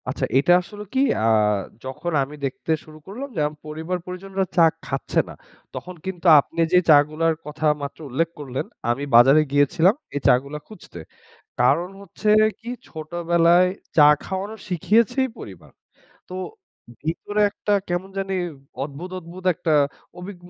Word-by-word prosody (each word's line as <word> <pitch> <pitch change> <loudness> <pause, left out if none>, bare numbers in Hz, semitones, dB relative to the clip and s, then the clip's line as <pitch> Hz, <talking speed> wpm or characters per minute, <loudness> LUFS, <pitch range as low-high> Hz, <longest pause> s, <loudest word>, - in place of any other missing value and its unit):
আচ্ছা - - -2
এটা 145 +6 +4
আসলে 205 +3 -10
কি 260 - +1 0.2
অ্যা - - -2 0.6
যখন 135 +6 -5
আমি 145 +3 -8
দেখতে 135 +4 -4
শুরু 155 0 -14
করলাম 250 +9 -7
যে, - - -2
আম 150 - -8
পরিবার 160 +4 -4
পরিজনরা 190 +1 -3
চা 170 - +7 0.2
খাচ্ছে - - -1
না। - - -8 0.4
তখন 180 0 -7
কিন্তু 190 -2 -6
আপনি 145 - -5
যে, - - +7
চা 150 - +9
গুলার 160 +1 0
কথা 150 +1 -5 0.2
মাত্র 140 0 -6
উল্লেখ 160 +6 0
করলেন, 130 -3 -4 0.2
আমি 125 +4 0
বাজারে 135 +6 +7
গিয়েছিলাম 160 +7 +3 0.2
এই - - 0
চা - - +7
গুলো 140 +2 -7
খুঁজতে। 180 - -12 0.6
কারণ 145 +8 +3
হচ্ছে 200 +2 -5 0.3
কি 235 +1 -7 0.2
ছোটবেলায় 170 +2 +2 0.3
চা 150 -2 +8 0.2
খাওয়ানো 195 +3 -4
শিখিয়েছেই 225 - +2
পরিবার। 95 -4 -11 0.6
তো 180 - -8 0.7
ভিতরে 205 +6 -2
একটা 205 +1 -3 0.2
কেমন 175 +2 -2
জানি 195 0 -2 0.5
অদ্ভুত, 150 +6 -8
অদ্ভুত 180 +2 -12
একটা 170 -1 -1 0.5
অভিগ 185 +2 -8
170 Hz, 150 wpm, -22 LUFS, 150-190 Hz, 0.7 s, চা